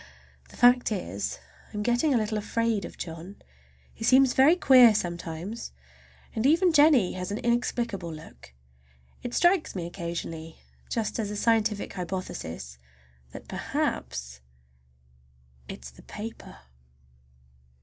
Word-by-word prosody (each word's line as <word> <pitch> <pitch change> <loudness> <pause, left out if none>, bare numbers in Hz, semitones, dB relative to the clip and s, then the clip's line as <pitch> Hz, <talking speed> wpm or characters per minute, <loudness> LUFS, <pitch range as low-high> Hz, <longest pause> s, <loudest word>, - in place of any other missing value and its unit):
The - - -15
fact 245 0 +5
is, 100 - -3 0.3
I - - -7
am 210 - -1
getting 240 +7 +2
a 255 - +4
little 215 -1 -1
afraid 225 -1 -1
of - - -10
John. 170 +4 -8 0.5
He - - -9
seems 260 +2 +5
very 280 +6 +6
queer 255 -9 +7
sometimes, 175 +4 -4 0.6
and 220 - -2
even 340 +3 +4
Jennie 290 - +5
has 185 +1 -5
an 205 - -2
inexplicable 235 -6 -1
look. 65 - -12 0.7
It 245 - -5
strikes 350 - +3
me 175 -3 -3
occasionally, 170 -2 -6 0.3
just 225 0 -2
as 210 -2 -2
a 210 - -4
scientific 220 -1 +1
hypothesis, 170 - -6 0.5
that - - -10
perhaps 60 +1 -3 1.3
it 65 - -9
is 65 - -8
the 65 - -17
paper! 225 +2 -9
210 Hz, 130 wpm, -27 LUFS, 170-240 Hz, 1.3 s, queer